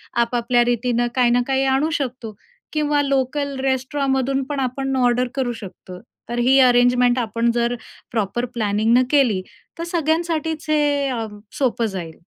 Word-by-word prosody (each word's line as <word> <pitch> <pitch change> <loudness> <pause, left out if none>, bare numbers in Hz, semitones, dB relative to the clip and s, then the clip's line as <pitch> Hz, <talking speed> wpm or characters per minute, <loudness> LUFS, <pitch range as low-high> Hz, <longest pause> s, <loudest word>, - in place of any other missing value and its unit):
आपापल्या 240 0 +2
रीतीनं 240 0 0
काही 250 -2 +3
ना 245 +1 +3
काही 270 0 +1
आणू 295 +4 +1
शकतो. 245 -5 -5 0.4
किंवा 295 -1 +1
लोकल 275 0 -1
रेस्टॉरमधून 270 0 0
पण 290 -1 -2
आपण 270 +1 -2
ऑर्डर 250 0 +2
करू 260 -3 -1
शकतो. 185 -2 -10 0.3
तर 240 0 -2
ही 265 +2 +5
अरेंजमेंट 245 0 +4
आपण 230 0 0
जर 240 +1 0 0.4
प्रॉपर 230 +2 -1
प्लॅनिंगन 225 +2 +2
केली 250 -10 +3 0.4
तर - - -2
सगळ्यांसाठीच 320 -1 -1
हे 290 -2 +2
अ, 235 -3 -2 0.3
सोपं 245 -4 +1
जाईल. 180 -6 -6
250 Hz, 140 wpm, -21 LUFS, 235-275 Hz, 0.4 s, ही